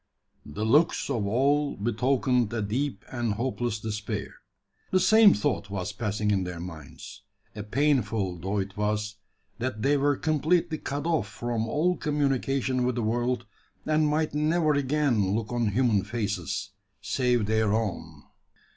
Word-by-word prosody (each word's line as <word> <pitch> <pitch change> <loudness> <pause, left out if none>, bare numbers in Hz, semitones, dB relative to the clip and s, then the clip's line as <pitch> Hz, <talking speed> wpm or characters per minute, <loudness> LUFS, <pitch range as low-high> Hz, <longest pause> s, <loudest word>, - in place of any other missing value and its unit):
The 75 +9 -4
looks 150 +5 +3
of 110 -6 -1
all 140 +6 +1
betokened 125 +2 +1
a 110 -3 -1
deep 120 +2 -2
and 120 -4 -1
hopeless 120 -1 -2
despair. 105 -2 -4 0.6
The 185 - +3
same 220 +2 +6
thought 100 0 -1
was 100 +1 -4
passing 105 -1 -1
in 95 -2 +1
their 90 -1 -5
minds. 85 -5 -9 0.3
A 105 - -5
painful 105 - 0
thought 100 +3 -1
it 95 0 -13
was 105 0 -1 0.4
that 115 -3 -3
they 145 +1 +3
were 145 0 +2
completely 155 +1 +1
cut 145 +1 -4
off 160 -10 +1
from 115 0 -3
all 175 +9 +1
communication 135 -3 0
with 125 -1 0
the 120 - -1
world, 120 +2 0 0.4
and 155 0 +2
might 155 0 0
never 155 +1 +2
again 135 -8 +1
look 115 +1 -3
on 120 -2 +1
human 105 -2 +2
faces, 105 -3 -3 0.3
save 125 -4 +1
their 110 0 +1
own! 85 -9 -3
120 Hz, 145 wpm, -27 LUFS, 105-140 Hz, 0.6 s, same